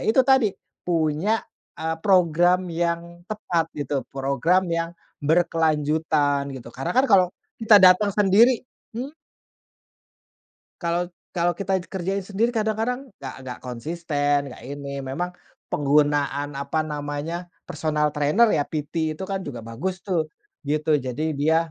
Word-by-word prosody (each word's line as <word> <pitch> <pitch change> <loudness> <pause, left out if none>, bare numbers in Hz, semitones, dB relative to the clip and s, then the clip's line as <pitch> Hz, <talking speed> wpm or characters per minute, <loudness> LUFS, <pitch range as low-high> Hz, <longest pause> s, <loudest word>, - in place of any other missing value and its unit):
itu 225 +4 +5
tadi, 265 -4 +5 0.4
punya, 170 +5 +1 0.4
eee, 160 0 -1
program 180 -1 +4
yang 170 0 -2
tepat 175 -6 -1
gitu, 145 -1 -2
program 140 +7 +1
yang 165 0 -1 0.3
berkelanjutan, 155 -2 +1
gitu. 120 -2 -9
Karena 135 - -3
kan 260 - +6
kalau 190 -3 +6 0.3
kita 220 -1 +7
datang 185 +3 +7
sendiri 210 +6 +4 0.3
hmm. 260 +5 -4 1.7
Kalau 170 +1 +1 0.3
kalau 175 0 +2
kita 195 +2 0 0.2
kerjain 190 +1 -2
sendiri 210 +4 0
kadang-kadang 225 +2 -1 0.2
nggak 135 -2 -6
nggak 125 -2 -6
konsisten 145 +3 -1
nggak - - -12
ini, 140 0 -6
memang 155 +7 -3 0.4
penggunaan, 145 0 +2
apa 150 +3 -1
namanya, 145 +1 -4 0.3
personal 150 -1 0
trainer 150 +11 +3
ya, 145 - +1
PT 155 +1 -2
itu 155 - -8
kan 195 - 0
juga 125 -5 -5
bagus 120 +12 -3
tuh, 170 -5 +1 0.4
gitu. 150 +2 0
Jadi 140 +4 -3
dia 160 +3 +2
160 Hz, 125 wpm, -24 LUFS, 145-185 Hz, 1.7 s, kita